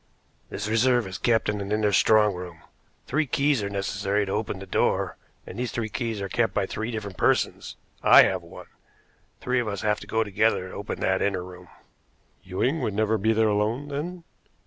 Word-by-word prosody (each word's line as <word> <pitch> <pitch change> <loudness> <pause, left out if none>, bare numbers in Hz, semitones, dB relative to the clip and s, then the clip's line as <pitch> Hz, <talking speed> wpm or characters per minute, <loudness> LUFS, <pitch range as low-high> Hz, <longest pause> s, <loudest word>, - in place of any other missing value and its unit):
"This 105 +1 -4
reserve 120 +2 +3
is 95 0 -6
kept 115 -2 +2
in 105 -1 -1
an 100 +1 -5
inner 105 -1 +2
strong 105 +1 +4
room. 90 -2 -9 0.4
Three 150 +2 0
keys 140 -2 +1
are 100 - -3
necessary 100 +1 -1
to 95 - -5
open 105 -1 -2
the 95 - -8
door, 95 - 0 0.3
and - - -8
these 125 -2 -2
three 110 -2 -3
keys 115 -2 -3
are 100 - -2
kept 115 +4 0
by 100 - +1
three 110 +4 -4
different 105 -5 -5
persons. - - 0 0.3
I - - +8
have - - 0
one. - - -12 0.8
Three 125 0 0
of 120 - -2
us 100 -2 -3
have 105 0 +1
to - - -11
go 110 0 +1
together 105 -2 +1
to - - -11
open 100 - -5
that 95 0 +1
inner 95 -3 0
room." 90 0 -12 0.7
"Ewing 110 - -1
would 105 - -2
never 110 +1 +1
be 110 +3 +2
there 110 0 +3
alone, 110 +7 -1
then?" 165 +5 -5
105 Hz, 200 wpm, -25 LUFS, 100-115 Hz, 0.8 s, I